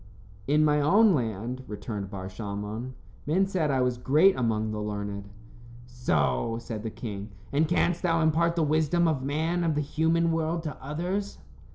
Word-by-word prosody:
"In 150 +2 +4
my 150 -1 +3
own 200 +8 +5
land," 120 - -2
returned 105 -1 -5
Bar 95 -2 -6
Shalmon, 105 +5 -5 0.3
"men 185 +6 +3
said 185 -6 0
I 135 -2 +2
was 125 -1 0
great 155 +10 +4
among 110 -3 0
the 105 0 -3
learned." 100 -1 -4 0.6
"So," 115 - 0
said 115 -2 -6
the 110 - -4
king. 105 -2 -6 0.2
"And 155 +3 +3
canst 175 0 +1
thou 165 -2 +2
impart 165 +2 +2
the 165 - +2
wisdom 160 +3 +2
of 155 -5 0
man 155 +5 -1
and 175 - 0
of 160 -2 +1
the 150 - +1
human 160 +3 +1
world 165 +1 -1
to 150 -4 -4
others?" 180 +8 -3
145 Hz, 175 wpm, -27 LUFS, 110-165 Hz, 0.6 s, own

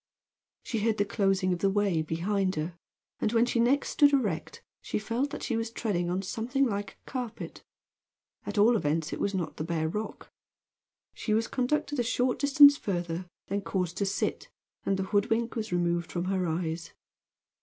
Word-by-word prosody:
She 225 - -2
heard 220 0 +1
the 205 - +2
closing 195 -2 +1
of 175 - -3
the 195 - +2
way 195 -4 +1
behind 185 +5 0
her, 155 +3 -3 0.5
and 215 - +1
when 230 0 +4
she 240 -1 0
next 255 +5 +3
stood 290 -1 +5
erect 260 - -1 0.2
she - - -2
felt 235 +6 -1
that - - -6
she 235 - -1
was 225 0 -1
treading 195 -7 -1
on 185 +2 -1
something 245 +8 0
like 205 -4 -2
a - - -37
carpet. 245 -4 -5 0.8
At 205 +1 -5
all 225 +4 +6
events 155 -4 0
it - - -4
was 200 -1 0
not 175 -3 -3
the 155 - -2
bare 160 -1 -1
rock. 210 +7 -5 0.8
She 215 - -1
was 225 +1 +1
conducted 290 +2 -1
a - - +3
short 250 +1 0
distance 285 +1 +8
further, 175 -4 -3 0.2
then 200 +1 -2
caused 180 -3 -2
to 200 - 0
sit, 195 - -2 0.4
and 195 - +2
the 190 - -1
hoodwink 220 +4 0
was 220 -3 -3
removed 175 -1 0
from 175 0 -2
her 185 -1 0
eyes. 165 0 -3
205 Hz, 185 wpm, -29 LUFS, 175-235 Hz, 0.8 s, distance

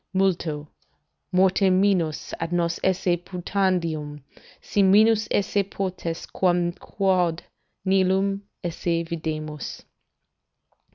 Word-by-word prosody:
"'Multo... 170 -6 0 0.6
mortem 185 0 +4
minus 185 -6 +1
ad 165 0 -3
nos 170 -1 0
esse 185 -1 +2
putandium, 170 -6 -1 0.4
Si 205 - 0
minus 215 +3 +5
esse 200 0 +1
potest, 185 -4 -4
quam 175 -2 +2
quod 180 -3 0 0.4
nihil 190 +1 +2 0.2
esse 170 0 -1
videmus. 155 -3 -5
180 Hz, 90 wpm, -24 LUFS, 165-190 Hz, 0.6 s, minus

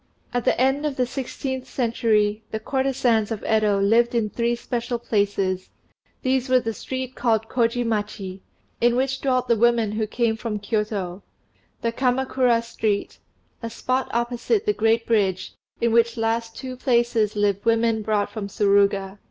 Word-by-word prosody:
] - - -32
At 245 -1 -1
the - - +2
end 270 +3 +2
of 295 -3 -1
the 255 - +1
sixteenth 260 +1 -4
century 220 -4 +1
the 220 - -3
courtesans 245 -3 +1
of 225 -3 -4
Yedo 215 -2 +2
lived 230 +4 +3
in 215 -3 0
three 235 0 0
special 240 0 -3
places: 200 -4 -1 0.5
these 260 -1 +1
were 255 0 +5
the 225 -2 -3
street 260 +3 -5
called 225 -3 0
Kôji 240 0 +1
machi, 205 -4 -3 0.4
in 240 0 +4
which 265 +1 0
dwelt 255 -2 +1
the 235 - +4
women 230 -1 +3
who 215 0 -1
came 230 0 0
from 225 -1 -4
Kiôto; 205 -3 -2 0.6
the 230 - +1
Kamakura 250 -1 +1
Street, 220 -3 -2 0.4
and 230 -1 -5
a - - -11
spot 255 +1 -1
opposite 240 - 0
the 420 - +2
great 225 - +2
bridge, 195 -5 0 0.3
in 235 0 +2
which 230 0 +3
last 225 0 -1
two 260 -1 -6
places 235 -4 +1
lived 205 -1 +1
women 230 -1 +2
brought 210 -1 0
from 210 -3 -5
Suruga. 200 -1 +2
230 Hz, 165 wpm, -23 LUFS, 210-250 Hz, 0.6 s, were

